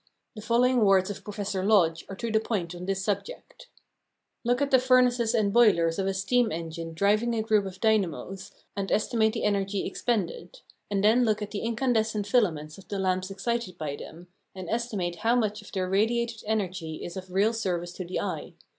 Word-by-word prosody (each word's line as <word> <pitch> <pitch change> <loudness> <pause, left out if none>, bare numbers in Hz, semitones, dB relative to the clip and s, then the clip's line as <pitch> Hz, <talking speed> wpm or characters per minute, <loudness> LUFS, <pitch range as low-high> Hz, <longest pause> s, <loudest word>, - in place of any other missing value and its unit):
The 215 - -7
following 245 +3 +3
words 195 -1 +4
of 205 - -8
Professor 200 -2 -3
Lodge 175 -6 +3
are 195 - -6
to 230 +3 -4
the 220 - +3
point 195 -6 -3
on 180 +1 -8
this 195 0 -1
subject: 215 - -4 0.8
"Look 245 +1 +1
at 285 -1 0
the 260 - +6
furnaces 250 -2 +3
and 205 -3 +1
boilers 190 -8 +4
of 195 - 0
a 195 - 0
steam 225 +4 +2
engine 165 0 -5
driving 210 +6 +2
a 220 - 0
group 215 -3 +2
of 190 0 -9
dynamos, 195 -2 0 0.3
and 195 -1 -3
estimate 220 0 +2
the 225 - -3
energy 200 -1 0
expended; 245 - -3 0.3
and 200 -1 0
then 225 +4 +5
look 215 -2 +1
at 210 - -7
the 205 - -3
incandescent 225 -3 0
filaments 170 -9 0
of 195 - -16
the 200 - -4
lamps 185 0 0
excited 200 0 -3
by 150 -3 -3
them, 170 +4 -11 0.3
and 185 -2 -6
estimate 210 -7 -2
how 230 +6 +2
much 215 -3 0
of 210 - -14
their 185 -1 -1
radiated 230 +4 0
energy 185 -7 -2
is 170 - -6
of 185 -1 -8
real 200 +5 +2
service 175 -5 -2
to 185 - -5
the 180 +1 -3
eye. - - -4
205 Hz, 195 wpm, -27 LUFS, 185-230 Hz, 0.8 s, the